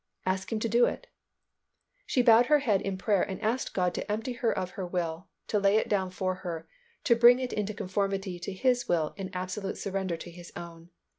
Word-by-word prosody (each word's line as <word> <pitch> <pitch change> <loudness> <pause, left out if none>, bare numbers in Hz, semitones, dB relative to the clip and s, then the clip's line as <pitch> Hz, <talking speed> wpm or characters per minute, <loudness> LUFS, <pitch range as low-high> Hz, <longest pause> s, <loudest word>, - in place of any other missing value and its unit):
"Ask 190 +2 -1
Him 225 - 0
to 230 - +1
do 235 +2 +4
it." - - -4 1.0
She 250 - +2
bowed 235 0 +6
her 300 - +6
head 220 -9 +1
in 195 -1 -3
prayer 200 0 +2
and 190 - -3
asked 225 +4 -1
God 180 -2 +1
to - - -4
empty 225 +4 -2
her 235 -1 0
of 180 -1 -3
her 190 - -5
will, 175 0 -3 0.2
to 210 - 0
lay 200 +1 +4
it - - +1
down 190 -3 0
for 185 0 -2
her, 165 -3 -5 0.4
to 235 - +4
bring 240 +1 +7
it 255 -1 -3
into 210 0 -2
conformity 195 -2 -2
to 175 - -5
His 245 +5 +1
will, 160 -3 +1
in 190 -2 -5
absolute 185 +2 -4
surrender 190 -3 -2
to 175 - -9
His 175 0 -11
own. 170 0 -9
195 Hz, 215 wpm, -29 LUFS, 180-225 Hz, 1.0 s, bring